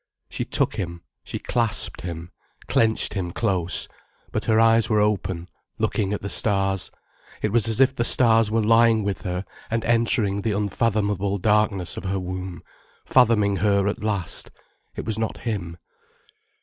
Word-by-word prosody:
She - - -3
took - - 0
him, 85 -2 -5 0.2
she - - -5
clasped 115 -4 +1
him, 85 -1 -7 0.4
clenched 110 -1 +2
him 95 -4 -3
close, 90 -4 0 0.4
but 110 0 -3
her 110 -1 +3
eyes 115 0 +4
were 110 -2 +3
open 95 -4 -1 0.3
looking 100 -2 -1
at 105 - -3
the - - -5
stars, 95 -2 0 0.5
it 105 - 0
was 115 -1 +3
as 110 - +1
if 135 0 +5
the 120 - -1
stars 115 -3 +4
were 110 0 +1
lying 115 0 +4
with 100 -1 -3
her 90 +1 -4 0.2
and 115 0 -1
entering 115 -3 +1
the 105 0 -1
unfathomable 100 -1 0
darkness 105 -2 +1
of - - -6
her 95 +1 -1
womb, 90 0 -6 0.4
fathoming 110 -6 +3
her 100 +1 +2
at 105 - -3
last. 100 -5 -2 0.5
It - - -5
was 110 -1 0
not 110 - -2
him. 95 -8 -4
105 Hz, 160 wpm, -23 LUFS, 95-115 Hz, 0.5 s, if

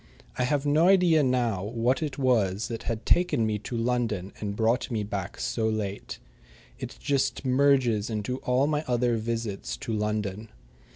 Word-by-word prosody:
I 125 - 0
have 145 +2 0
no 155 +4 +4
idea 180 -5 +5
now 120 -7 +1
what 115 +5 0
it 150 -3 -3
was 115 -6 +1
that 115 -1 -4
had 115 -1 -3
taken 175 -10 +3
me 105 -1 -1
to 115 +3 -5
London 115 -5 -1
and 100 -1 -3
brought 115 +3 +1
me 110 -3 -1
back 100 -3 -5
so 110 -1 0
late. 105 -2 -4 0.6
It - - -7
just 140 0 0
merges 130 -5 +3
into 110 +3 -2
all 125 +1 +1
my 150 0 0
other 120 -1 +1
visits 110 - -3
to 115 - -4
London. 105 0 -2
115 Hz, 165 wpm, -27 LUFS, 105-130 Hz, 0.6 s, idea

